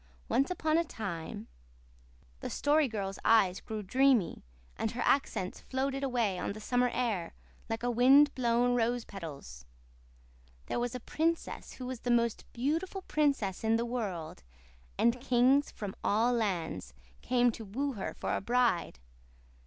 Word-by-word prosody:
Once 275 - +2
upon 320 -3 +1
a - - +2
time" 170 - -6 0.9
the - - -5
Story 295 0 +2
Girl's 195 -4 -4
eyes 195 -5 +4
grew 215 -2 -5
dreamy, 255 -1 +2 0.3
and 225 - -1
her 240 - -3
accents 190 -9 0
floated 270 +1 -2
away 235 -8 0
on - - -2
the 215 - -9
summer 245 +3 +1
air 220 -10 -2 0.3
like 225 +1 -3
wind 255 +5 +5
blown 245 0 +2
rose 240 0 +1
petals 140 - -9 1.0
"there - - -2
was 245 0 -2
a - - -3
princess 325 +6 -2
who 255 - -8
was 255 -1 -5
the 245 - -4
most 235 -1 +1
beautiful 325 +10 -2
princess 280 - 0
in 220 0 +3
the 230 +1 0
world, 200 -10 -4 0.6
and 235 +1 +2
kings 260 +2 +3
from 205 -3 -6
all 225 +4 +2
lands 165 - -2 0.3
came 245 -1 +3
to 225 - -8
woo 265 +8 -2
her 200 - -5
for - - -2
a - - -2
bride. 235 - +1
240 Hz, 150 wpm, -31 LUFS, 200-260 Hz, 1.0 s, wind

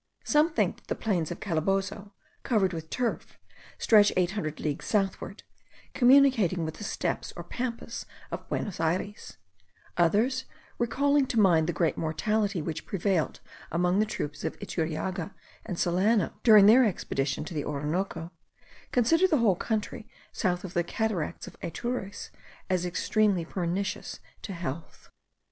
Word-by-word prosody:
Some 300 +2 +3
think - - 0
that - - -24
the - - -1
plains 180 -8 -1
of - - -6
Calabozo, 195 +3 -1 0.3
covered 200 -7 +1
with 160 -1 -6
turf, 245 -2 -3 0.4
stretch 210 -2 +5
eight 180 -1 +2
hundred 155 -7 -4
leagues 150 -1 -3
southward, 195 -1 -1 0.5
communicating 245 - +5
with 160 - -5
the - - -8
Steppes - - -2
or - - -6
Pampas 240 -2 -5 0.2
of - - -6
Buenos 195 -5 -3
Ayres; 180 +6 -2 0.6
others, 225 +10 +2 0.3
recalling 280 +4 +2
to 235 - 0
mind 170 -6 +4
the - - +1
great 165 0 0
mortality 195 +3 0
which 160 0 -5
prevailed 190 -4 0 0.3
among 180 +3 +2
the 215 - +2
troops 150 -8 -5
of 160 - -3
Iturriaga 180 +1 -3 0.3
and 185 -5 -4
Solano, 185 +4 +2
during 215 -4 +8
their 235 +5 +8
expedition 150 - -1
to 170 - -7
the 150 -2 -2
Orinoco, 165 +3 -3 0.6
consider 325 +10 +4
the 320 -5 +3
whole 225 -7 +3
country, 220 +3 -3 0.2
south 180 -1 -1
of 185 -2 -7
the 175 - +1
cataracts 200 -2 -2
of - - -11
Atures, 205 +2 -4 0.4
as 180 -1 +1
extremely 195 0 +1
pernicious 185 +3 -3 0.2
to 200 - -6
health. 165 -3 -7
195 Hz, 145 wpm, -28 LUFS, 170-220 Hz, 0.6 s, during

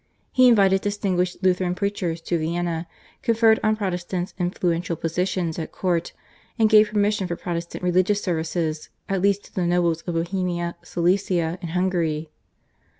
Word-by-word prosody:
He 255 0 +5
invited 195 -5 +5
distinguished 190 -3 -1
Lutheran 180 -1 +2
preachers 180 -4 -2
to 170 0 -1
Vienna, 170 +1 -2 0.3
conferred 225 -2 +4
on 215 0 +2
Protestants 180 -3 -3
influential 175 -1 -1
positions 170 +1 -2
at 160 - -5
court, 175 -3 -1 0.5
and 220 -1 +3
gave 215 -1 +7
permission 205 -2 +1
for 170 - -3
Protestant 170 0 -5
religious 185 +3 +2
services 160 -2 -2 0.2
at 195 -2 -1
least 200 +1 +2
to - - -18
the 180 -2 0
nobles 170 -2 +1
of 175 -1 -4
Bohemia, 175 0 -2
Silesia, 175 -1 0
and 170 - -5
Hungary. 165 -4 0
180 Hz, 145 wpm, -23 LUFS, 170-195 Hz, 0.5 s, gave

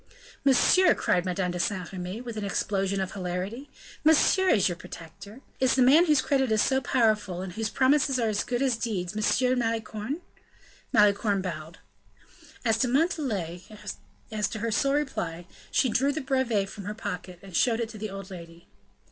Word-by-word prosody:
"Monsieur!" 280 +7 +5
cried 180 0 +1
Madame 180 0 -1
de 180 - -4
Saint 185 -1 -2
Remy, 185 +4 -5
with 240 -2 -7
an 215 - -4
explosion 195 -1 -1
of 190 -1 -2
hilarity, 195 +8 -4 0.3
"monsieur 320 +5 +4
is 200 - +4
your 175 - -2
protector! 180 +6 -11 0.2
Is 260 -1 +3
the 260 - +4
man 305 +8 +6
whose 300 -4 +4
credit 265 -4 +1
is 215 - +3
so 265 0 +1
powerful, 215 -8 +1
and 185 -2 -7
whose 220 +2 -2
promises 270 +1 +2
are 230 - +1
as 210 -1 0
good 245 +1 -1
as 255 -4 +1
deeds, 200 -6 -3
Monsieur 250 +4 +2
Malicorne!" 225 +4 -2 0.7
Malicorne 205 -1 +3
bowed. 165 -1 -6 0.9
As 225 -1 +2
to 250 - +2
Montalais, 245 - 0 0.7
as 210 -1 -1
her 225 +1 -2
sole 275 +5 +2
reply, 175 - -2 0.2
she - - +2
drew 265 +5 +2
the 300 - -3
brevet 260 -7 0
from 195 0 -9
her 210 +1 -4
pocket, 180 -4 -6
and 190 -3 -10
showed 230 +3 +3
it 230 -2 -2
to 215 -2 -10
the 215 0 -4
old 195 0 -8
lady. 170 -1 -11
215 Hz, 175 wpm, -27 LUFS, 190-260 Hz, 0.9 s, man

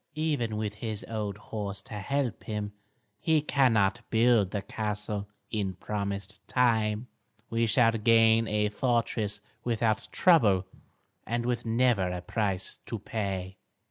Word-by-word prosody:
"Even 145 -9 0
with 105 -1 -2
his 110 -3 -3
old 105 -3 -3
horse 105 -2 -4
to - - -11
help 125 +5 -2
him, 105 -1 -3 0.5
he 160 -1 +3
cannot 120 -7 +2
build 115 -3 +4
the 100 0 -3
castle 105 0 -3 0.2
in 105 -3 0
the 95 - -4
promised 100 0 -4
time. 110 -3 +2 0.5
We 115 0 +2
shall 115 +1 +4
gain 115 0 +4
a 105 0 +1
fortress 110 -3 0 0.2
without 115 -2 0
trouble 105 - +4 0.6
and 120 +1 -1
with 120 -1 -1
never 115 -5 +2
a 90 0 -4
price 95 -2 -1
to 115 - -3
pay." 95 -3 -4
110 Hz, 135 wpm, -29 LUFS, 100-115 Hz, 0.6 s, build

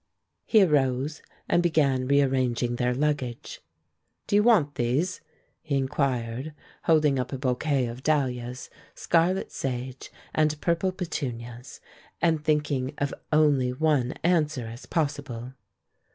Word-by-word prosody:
He 215 -3 +6
arose 140 -2 +1 0.3
and 175 - +3
began 140 -7 +2
rearranging 130 -3 +1
their 125 0 +1
luggage. 140 -4 -2 0.6
"Do - - 0
you 205 - +6
want 205 -11 +4
these?" 130 +10 -1 0.4
he 150 -3 -1
inquired, 135 0 -1 0.3
holding 150 -5 +3
up 125 0 -3
a 135 - -3
bouquet 130 +1 0
of 120 +2 -6
dahlias, 125 -4 -1 0.2
scarlet 175 +3 +1
sage, 130 0 -5 0.2
and 155 -1 +1
purple 170 +3 +1
petunias, 125 - -6 0.4
and 160 -3 +1
thinking 150 -3 0
of 145 -1 -1 0.2
only 145 -5 +3
one 130 -2 +1
answer 155 -7 +1
as 115 +3 -9
possible. 140 -6 -3
140 Hz, 120 wpm, -26 LUFS, 125-155 Hz, 0.6 s, He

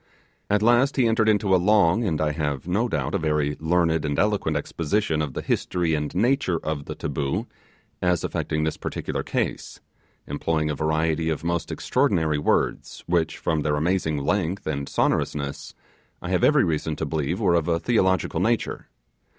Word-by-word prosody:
At 105 +1 +2
last 120 +4 +4
he 130 - +3
entered 110 -1 +3
into 105 -2 +2
a 90 - +4
long, 105 +1 +4
and 80 -6 0
I 75 -1 +1
have 75 -1 -3
no 110 +7 +1
doubt 75 -3 -2
a - - +1
very 75 -2 0
learned 80 -1 +1
and 75 -2 -2
eloquent 100 -7 +1
exposition 80 +2 -1
of 75 -4 -3
the - - -3
history 85 -3 0
and 75 +1 -2
nature 115 -3 +2
of 75 -2 -3
the - - -6
'taboo' 70 -1 -2 0.6
as 90 -2 +1
affecting 75 0 -2
this 80 - -1
particular - - -4
case; - - -3 0.5
employing 75 +1 -1
a - - -2
variety 80 +2 0
of 80 -1 -2
most 85 0 -2
extraordinary 85 - +1
words, 75 - -1
which, 85 -2 0
from 80 -1 -1
their 75 0 0
amazing 80 0 0
length 90 +5 -1
and 70 -2 -3
sonorousness, 70 -1 -1 0.4
I 90 - -6
have 90 -2 +1
every 150 -2 +5
reason 80 -2 -1
to - - -3
believe 80 +4 -2
were 95 -6 +2
of 85 -2 +1
a 85 -1 +1
theological 95 -4 +1
nature. - - -1
80 Hz, 175 wpm, -24 LUFS, 75-95 Hz, 0.6 s, every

